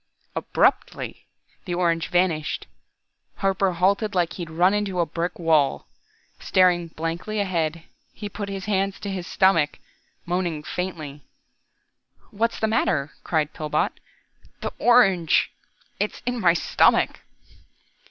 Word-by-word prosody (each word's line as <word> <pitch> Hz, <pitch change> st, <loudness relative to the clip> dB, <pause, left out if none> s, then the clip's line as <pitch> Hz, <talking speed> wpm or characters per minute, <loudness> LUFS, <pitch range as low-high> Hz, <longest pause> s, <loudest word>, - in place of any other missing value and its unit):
Abruptly, -, -, 0 dB, 0.4 s
the 175 Hz, -2 st, -2 dB
orange 170 Hz, -2 st, +1 dB
vanished. 175 Hz, -4 st, 0 dB, 0.7 s
Harper 195 Hz, -1 st, +1 dB
halted 200 Hz, +4 st, +1 dB
like 175 Hz, -2 st, +1 dB
he'd 170 Hz, -3 st, -6 dB
run 175 Hz, +4 st, +3 dB
into 205 Hz, -3 st, -1 dB
a 170 Hz, -, +3 dB
brick 170 Hz, +3 st, -3 dB
wall. 155 Hz, -, +2 dB, 0.5 s
Staring 180 Hz, -2 st, +3 dB
blankly 165 Hz, +7 st, -4 dB
ahead, 170 Hz, -4 st, -1 dB, 0.3 s
he 205 Hz, -, -7 dB
put 205 Hz, 0 st, -6 dB
his 195 Hz, -1 st, -5 dB
hands 195 Hz, -1 st, 0 dB
to 200 Hz, -, -4 dB
his 185 Hz, -2 st, -4 dB
stomach, 165 Hz, -6 st, +3 dB, 0.5 s
moaning 175 Hz, -3 st, -1 dB
faintly. 155 Hz, -5 st, -5 dB, 1.1 s
"What's 230 Hz, +2 st, -1 dB
the -, -, +1 dB
matter?" 160 Hz, -10 st, +1 dB
cried 155 Hz, -2 st, 0 dB
Pillbot. 155 Hz, -1 st, -1 dB, 0.6 s
"The -, -, -4 dB
orange 195 Hz, -9 st, +4 dB, 0.5 s
it's 210 Hz, +1 st, -2 dB
in 245 Hz, 0 st, -1 dB
my 175 Hz, -3 st, +5 dB
stomach!" -, -, +3 dB
180 Hz, 120 wpm, -24 LUFS, 165-195 Hz, 1.1 s, my